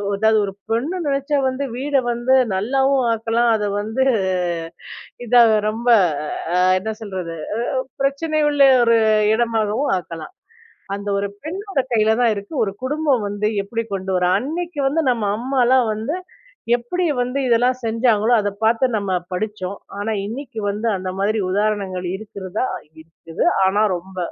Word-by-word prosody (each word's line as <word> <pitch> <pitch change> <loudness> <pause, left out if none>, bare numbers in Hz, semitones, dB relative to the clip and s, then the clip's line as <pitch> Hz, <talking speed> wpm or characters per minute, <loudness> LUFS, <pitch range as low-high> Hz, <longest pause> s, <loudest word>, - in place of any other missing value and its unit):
அதாவது 220 +2 +3
ஒரு 195 - -6 0.2
பெண்ணு 275 +11 -1
நெனைச்சா 280 +1 0
வந்து 260 +2 -3
வீட 275 +1 +1
வந்து 240 +3 +2 0.2
நல்லாவும் 265 +5 +1
ஆக்கலாம். 230 +1 +1
அதை 210 -1 -2
வந்து, 225 +5 -1 1.2
இதா 240 +1 +6 0.3
ரொம்ப 230 +3 -2 0.7
அ - - +3 0.2
என்ன 220 +3 -4
சொல்றது? 185 -6 -5 0.7
பிரச்சனை 310 +3 0
உள்ள 290 -1 -3 0.2
ஒரு 230 -1 +4 0.4
இடமாகவும் 225 +2 0
ஆக்கலாம். 170 - -9 0.6
அந்த 200 0 -7
ஒரு 200 - -1 0.2
பெண்ணோட 380 -1 -2
கையில 220 -1 +3
தான் 235 -2 +4
இருக்கு. 200 +10 -7
ஒரு 195 - -3
குடும்பம் 280 -5 +1
வந்து 205 +1 -2 0.2
எப்படி 230 +3 -3
கொண்டு 190 0 -4
வர 180 - +2
அன்னைக்கிவந்து 310 0 -1
நம்ம 230 -4 -1
அம்மாலாம் 255 0 +2
வந்து 220 +9 -3 0.6
எப்படி 300 +10 -3 0.2
வந்து 250 +2 -1
இதெல்லாம் 245 +2 +3
செஞ்சாங்களோ 225 0 +2
அத 205 0 -1
பார்த்து 230 +4 +3
நம்ம 200 -2 -2 0.2
படிச்சோம். 200 0 -4 0.2
ஆனா 215 +2 -2
இன்னைக்கி 230 0 -6
வந்து 210 +3 -2
அந்த 185 0 -4
மாதிரி 215 +3 +1
உதாரணங்கள் 195 -2 -1
இருக்கிறதா? 200 +2 -4 0.4
இருக்குது, 165 0 -5 0.2
ஆனா 205 +3 +2
ரொம்ப 185 +2 -10
225 Hz, 135 wpm, -20 LUFS, 205-265 Hz, 1.2 s, இதா